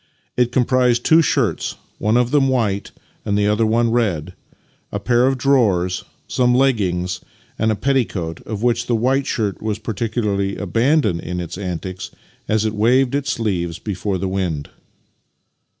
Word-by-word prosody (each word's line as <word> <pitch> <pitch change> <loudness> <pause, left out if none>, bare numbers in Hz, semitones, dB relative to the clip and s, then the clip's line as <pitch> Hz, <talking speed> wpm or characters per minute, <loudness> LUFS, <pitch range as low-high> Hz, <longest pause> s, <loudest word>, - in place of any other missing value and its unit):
It 125 -1 +2
comprised 125 -1 +2
two 160 +1 +6
shirts 120 - 0 0.2
(one 110 +3 +2
of 125 0 +1
them 145 -2 +4
white 110 -7 0 0.3
and 100 -2 0
the 105 - +2
other 105 +2 +2
one 115 +1 +2
red), 100 -11 0 0.6
a 100 - -2
pair 120 +4 +3
of 135 0 +1
drawers, 105 -10 +2 0.2
some 125 -1 +2
leg 135 -1 +4
gings, 90 -2 -2 0.4
and 110 0 +2
a - - +1
petticoat, 105 -10 -1
of 110 -1 -4
which 120 0 +1
the 120 - +2
white 130 +4 +1
shirt 105 -4 -2
was 110 -1 -2
particularly 105 -2 -2
abandoned 115 - +1
in 90 +1 -4
its 85 -2 -5
antics 90 -1 -5 0.4
as 110 0 +1
it 110 - 0
waved 125 +5 +3
its 140 0 0
sleeves 90 -7 -2
before 100 -1 -3
the 95 +2 -2
wind. 90 -6 -2
110 Hz, 160 wpm, -20 LUFS, 95-125 Hz, 0.6 s, two